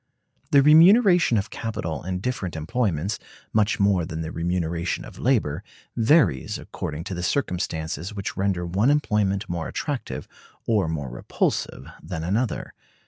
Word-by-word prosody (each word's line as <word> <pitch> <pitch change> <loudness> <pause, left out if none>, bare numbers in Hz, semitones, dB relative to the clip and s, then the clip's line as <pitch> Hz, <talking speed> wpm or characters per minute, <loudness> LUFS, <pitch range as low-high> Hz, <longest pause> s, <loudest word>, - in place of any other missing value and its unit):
The 140 -1 +6
remuneration 175 - +6
of 100 +2 -2
capital 85 -9 -4
in 90 +1 -3
different 105 -8 -3
employments, 95 - -1 0.3
much 110 0 +2
more 100 -3 +3
than 80 0 -5
the 80 0 -4
remuneration 85 0 -2
of - - -12
labor, 105 - +1 0.3
varies 115 - +3
according 75 +2 -6
to 95 - -5
the 90 - -4
circumstances 85 - -2
which 100 -2 -5
render 95 -3 0
one 95 +9 +2
employment 105 -9 +1
more 85 -1 -3
attractive 145 -4 -4 0.4
or 105 -7 +2
more 75 -5 -3
repulsive - - -2 0.2
than 80 -1 -5
another. 105 +8 -1
95 Hz, 140 wpm, -24 LUFS, 85-115 Hz, 0.4 s, The